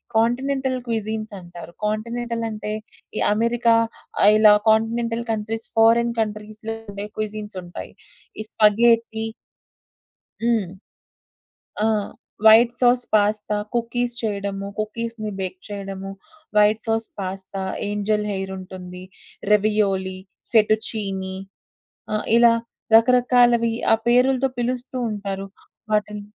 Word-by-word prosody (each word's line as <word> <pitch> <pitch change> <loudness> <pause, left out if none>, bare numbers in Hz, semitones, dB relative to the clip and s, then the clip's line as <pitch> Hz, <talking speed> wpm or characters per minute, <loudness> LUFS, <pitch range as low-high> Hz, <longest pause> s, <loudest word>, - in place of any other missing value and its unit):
Continental 260 +3 +1
క్విజీన్సంటారు. 210 -6 -5
కాంటినెంటలంటే 225 0 -3 0.5
ఈ - - 0
America, 235 +1 +2 0.5
ఆహ్, 205 - +8
ఇలా 215 -1 +7 0.2
కాంటినెంటల్ 230 +1 +1
కంట్రీస్, 220 +1 -3
ఫారెన్ 230 +1 +4
కంట్రీస్‌లో 215 +1 -4 0.2
ఉండే 200 +1 -5
క్విజీన్సుంటాయి. 210 -4 -6 0.5
ఈ 215 - -3
స్పగేటి 225 +1 +3 1.2
హ్మ్. 225 -7 +1 1.1
ఆ! - - +3 0.6
వైట్ 230 +2 +8
సాస్ 245 0 +4
పాస్తా, 210 0 +2 0.2
కుకీస్ 240 +1 -1
చేయడము, 200 -2 -3
కుకీస్‌ని 215 0 -4
బేక్ 185 -1 -4
చేయడము. 195 -1 -6 0.5
White 210 +1 +4
sauce 225 0 -1
pasta, 190 0 -5 0.3
angel 210 +1 0
హెయిరుంటుంది. 185 -1 -7 0.5
Ravioli, 195 -3 +1 0.3
set 215 -1 +5
చీనీ. 190 -3 -4 0.8
ఆ! - - +2 0.2
ఇలా 235 -1 +6 0.4
రకరకాలవి 240 0 +4 0.2
ఆ - - +7
పేరులుతో 255 +2 +3
పిలుస్తూంటారు. 235 -6 -3 0.4
వాటిల్ 210 0 0
215 Hz, 90 wpm, -22 LUFS, 205-235 Hz, 1.2 s, ఆహ్